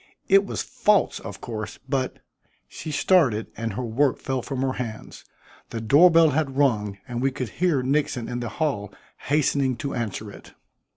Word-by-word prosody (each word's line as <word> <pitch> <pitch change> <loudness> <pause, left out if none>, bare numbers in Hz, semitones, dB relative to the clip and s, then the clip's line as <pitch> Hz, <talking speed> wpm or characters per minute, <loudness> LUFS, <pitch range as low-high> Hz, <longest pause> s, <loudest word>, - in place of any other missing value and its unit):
It 195 +1 +5
was - - -3
false, 210 -2 +2
of 100 -4 -9
course, 110 -3 -6
but 130 -3 -1 0.2
" - - -41
She - - -8
started, 145 - +2
and 115 -1 -3
her 125 - -3
work 125 +4 +1
fell 130 -1 -2
from 135 0 -3
her 130 -1 0
hands. 110 -3 -7 0.5
The 115 - -4
door 145 +11 +6
bell 165 -2 +5
had 135 -2 -1
rung 105 -8 +1
and 120 -1 -4
we 135 - +3
could 130 -2 -5
hear 165 -7 +1
Nixon 135 -3 0
in 120 0 -3
the 120 -2 -4
hall 115 -9 -2 0.3
hastening 140 -2 +1
to 140 +4 -4
answer 110 -2 -4
it. - - -14
130 Hz, 180 wpm, -24 LUFS, 115-145 Hz, 0.5 s, door